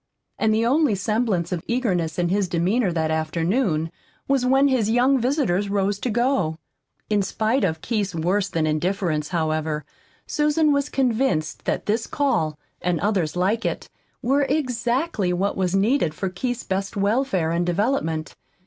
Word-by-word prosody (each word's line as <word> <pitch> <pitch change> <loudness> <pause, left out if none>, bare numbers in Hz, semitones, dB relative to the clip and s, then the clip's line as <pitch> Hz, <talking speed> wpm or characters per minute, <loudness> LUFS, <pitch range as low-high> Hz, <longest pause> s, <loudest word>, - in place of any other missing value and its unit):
And 220 - +2
the 220 +1 +2
only 275 -2 +3
semblance 195 -3 0
of 175 -3 -2
eagerness 185 -10 0
in 175 -1 +1
his 195 +1 +1
demeanor 185 +5 +1
that 160 -1 0
afternoon 165 +2 0 0.4
was 270 -2 +2
when 270 +2 +4
his 250 -6 +1
young 255 +4 +3
visitors 235 - 0
rose 200 0 0
to 250 - -2
go. 235 - +1 0.5
In 210 -1 +2
spite 220 +5 0
of 160 -4 0
Keith's 205 -6 -1
worse 185 +4 0
than 160 -1 0
indifference, 155 -1 0
however, 155 -2 -1 0.4
Susan 300 +1 +2
was 280 +1 0
convinced 240 - 0
that - - -1
this 225 +2 0
call, 165 - 0 0.2
and 180 -2 0
others 190 -7 0
like 195 +6 +1
it, - - -3 0.3
were 270 +4 +2
exactly 250 - 0
what 195 +3 0
was 185 -1 0
needed 195 - +2
for 190 +4 -2
Keith's 245 +6 -3
best 195 +3 -3
welfare 200 -5 +1
and 170 +1 +1
development. 175 -5 -1
200 Hz, 155 wpm, -23 LUFS, 170-245 Hz, 0.5 s, when